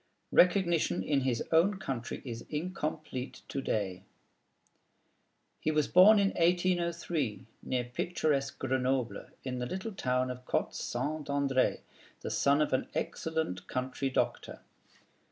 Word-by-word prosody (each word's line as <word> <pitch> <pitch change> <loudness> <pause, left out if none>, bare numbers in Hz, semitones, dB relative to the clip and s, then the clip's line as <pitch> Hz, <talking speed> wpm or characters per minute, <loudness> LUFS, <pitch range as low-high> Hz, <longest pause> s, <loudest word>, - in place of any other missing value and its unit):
Recognition 175 -2 +3
in 145 -2 +1
his 125 -3 0
own 180 +5 +4
country 135 -12 -4
is 115 -2 -5
incomplete 155 -5 -4
to 135 - -2
day. 95 -7 -2 1.6
He - - -1
was 150 -2 +2
born 200 +4 +8
in 200 -1 +4
1803, 170 - 0 0.2
near 125 -1 -1
picturesque 140 +2 -1
Grenoble, 130 -2 -1 0.2
in 125 -1 -3
the 125 - -2
little 190 - -4
town 125 -5 0
of 125 0 -8
Côte - - 0
St. 145 +5 -3
André, 140 -2 +1 0.4
the - - -4
son 140 +2 +3
of 150 - -2
an 130 - +1
excellent 160 - -2
country 130 +1 -2
doctor. 130 - -2
140 Hz, 125 wpm, -31 LUFS, 125-170 Hz, 1.6 s, born